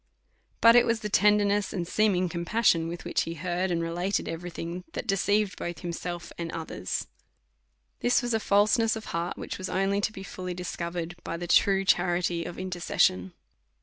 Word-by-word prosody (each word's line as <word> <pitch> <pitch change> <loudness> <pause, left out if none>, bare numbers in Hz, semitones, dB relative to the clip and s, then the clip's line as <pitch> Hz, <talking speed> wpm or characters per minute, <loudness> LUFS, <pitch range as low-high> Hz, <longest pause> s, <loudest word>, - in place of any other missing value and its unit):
But 230 0 +8
it 240 0 +6
was 230 -1 +1
the 210 - -3
tenderness 205 0 +3
and 175 -3 -3
seeming 185 -2 +2
compas 175 +7 -2
sion 165 -3 +4
with 170 +1 -6
which - - 0
he 165 - -4
heard 180 +3 -1
and 170 -1 0
related 175 +4 -1
every 170 +2 -5
thing, 170 +1 -6
that - - -4
deceived 195 0 +1
both 175 -2 -5
himself 175 0 -5
and 165 -1 -3
others. 160 - -4 0.9
This 245 +1 +2
was 240 -1 -1
a 225 - +2
falseness 215 +2 +3
of 220 - -7
heart, 170 +1 -2
which - - -6
was 185 - -4
only 195 +2 +1
to 215 - 0
be 195 -3 -9
fully 180 -1 -6
discover 175 -1 -5
ed 170 +2 -7
by 165 - -4
the 175 - -5
true 195 +2 +4
charity 175 -2 +1
of 175 - -7
intercession. 170 - 0
180 Hz, 185 wpm, -27 LUFS, 170-205 Hz, 0.9 s, But